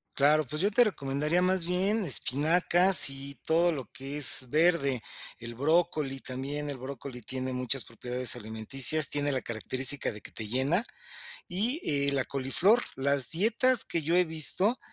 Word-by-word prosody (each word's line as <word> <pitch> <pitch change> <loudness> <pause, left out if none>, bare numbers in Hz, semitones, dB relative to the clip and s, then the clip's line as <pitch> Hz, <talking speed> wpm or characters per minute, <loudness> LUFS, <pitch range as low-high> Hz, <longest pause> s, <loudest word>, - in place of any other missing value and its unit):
Claro, 150 +2 -1
pues 150 +5 -6
yo 200 - -1
te 245 +4 +1
recomendaría, 150 - -5
más 185 -1 -2
bien, 195 +5 -4
espinacas 170 +4 +5
y 135 +1 -11
todo 170 +2 -1
lo 140 -6 -9
que 135 +2 -9
es 135 -2 +8
verde, 150 -4 -1 0.4
el 120 0 -11
brócoli 150 -1 -4
también, 140 +3 -8
el 140 - -7
brócoli 130 -1 -12
tiene 130 +3 -8
muchas 125 0 -3
propiedades 125 +2 -1
alimenticias, 125 +7 +2
tiene 145 0 -3
la 130 -2 -5
característica 130 +5 0
de 105 - -12
que - - -13
te 110 - -8
llena, 135 - -3 0.7
y, 230 - -4 0.3
eh, - - -1
la 135 -2 -3
coliflor. 140 - -2
Las 140 -1 +1
dietas 225 +7 +3
que 165 - -5
yo 165 +3 -4
he 180 - 0
visto, 175 - +3
145 Hz, 160 wpm, -24 LUFS, 130-175 Hz, 0.7 s, es